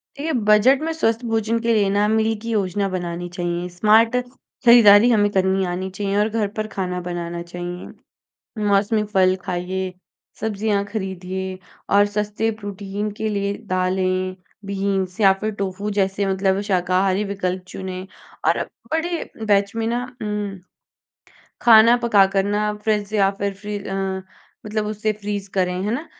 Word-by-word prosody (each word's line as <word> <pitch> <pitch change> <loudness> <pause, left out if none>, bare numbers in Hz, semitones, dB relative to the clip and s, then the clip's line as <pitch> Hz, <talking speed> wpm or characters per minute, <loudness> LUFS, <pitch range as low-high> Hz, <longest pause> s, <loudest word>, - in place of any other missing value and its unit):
देखिए, 300 +3 -3
बजट 225 +4 +4
में 325 +1 -1
स्वस्थ 230 -6 0
भोजन 225 0 0
के 230 0 +1
लिए 205 -3 +3
ना, 205 +1 +2
मील 220 +1 +2
की 230 - -6
योजना 200 -2 0
बनानी 175 -1 -4
चाहिए। 175 0 -3
स्मार्ट 215 +6 +4 0.5
खरीदारी 235 -2 +8
हमें 205 -3 +3
करनी 190 0 +1
आनी 185 +2 -3
चाहिए 195 +1 -3
और 210 +1 +2
घर 220 -1 0
पर 215 0 -1
खाना 180 -3 -3
बनाना 175 -1 -4
चाहिए। 175 +1 -7 0.8
मौसमी 205 +2 +2
फल 185 -1 +4
खाइए, 185 +1 -3 0.5
सब्ज़ियाँ 210 -1 0
खरीदिए 190 -2 -5 0.3
और 205 0 +5
सस्ते 210 +2 -1
प्रोटीन 205 +1 -4
के 220 - -1
लिए 200 -1 -1 0.2
दालें, 185 0 0 0.3
बीन्स, 195 0 -2
या 195 -2 +7
फिर 215 - -1
टोफू 200 +2 -3
जैसे 195 +1 0
मतलब 190 0 +1
शाकाहारी 185 +2 +2
विकल्प 185 -2 -3
चुनें 185 0 -6 0.4
और - - +4
अब - - -3 0.2
बड़े 330 +1 -2 0.2
बैच 200 0 +2
में 225 0 -1
ना 240 +2 -1 0.2
उम, 210 -2 -3 1.0
खाना 230 0 +7
पकाकर 195 -4 +4
ना, 205 +1 0
अब 210 0 -3
फ्रिज 210 -1 0
या 195 -2 +4
फिर 200 0 -1
फ्री 205 +1 -5
अ, 195 -1 -6 0.7
मतलब 215 0 -2
उसे 215 0 -1
फ्रीज़ 205 -1 -5
करें। 180 -2 +1
है 205 - -1
ना? 300 +6 -4
200 Hz, 155 wpm, -21 LUFS, 190-215 Hz, 1.0 s, खरीदारी